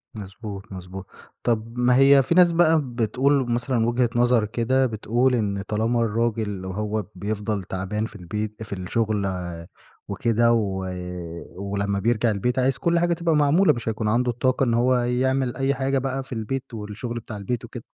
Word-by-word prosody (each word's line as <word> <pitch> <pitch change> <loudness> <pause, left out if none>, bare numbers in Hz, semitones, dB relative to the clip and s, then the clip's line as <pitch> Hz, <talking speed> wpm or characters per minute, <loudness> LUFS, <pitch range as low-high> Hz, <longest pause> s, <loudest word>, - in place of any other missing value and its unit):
مضبوط، 100 0 -8
مضبوط. 95 +1 -8 0.4
طب 115 0 -1
ما 125 0 +4
هي 135 +1 +6
في 170 - 0
ناس 180 -1 +6
بقى 165 -2 +4
بتقول 125 +2 +1
مثلًا 120 -1 +1
وجهة 120 0 +2
نظر 120 -2 +3
كده، 120 +5 +1
بتقول 120 +2 +1
إن 100 -4 -1
طالما 115 +3 0
الراجل 110 -3 -1
وهو 105 +2 -2
بيفضل 105 -1 -3
تعبان 95 +4 -3
في 110 - -10
البيت 105 +4 -5
في 105 - -6
الشغل 100 +2 -1 0.8
وكده 115 0 +2
و 95 -4 -1 0.7
ولما 100 +1 -2
بيرجع 115 +1 +2
البيت 120 +6 -1
عايز 130 +1 +2
كل 170 0 +1
حاجة 175 0 +2
تبقى 170 -1 0
معمولة 150 +6 +4
مش 120 -1 -4
هيكون 110 0 -2
عنده 120 +3 +2
الطاقة 130 +3 +1
إن 120 -3 +1
هو 125 +2 +3
يعمل 125 +1 0
أي 135 0 +1
حاجة 135 0 0
بقى 135 0 -2
في 130 - -8
البيت 125 +4 -4
والشغل 110 +2 -5
بتاع 110 -2 -8
البيت 110 +4 -3
وكده. - - -9
115 Hz, 165 wpm, -24 LUFS, 105-130 Hz, 0.8 s, هي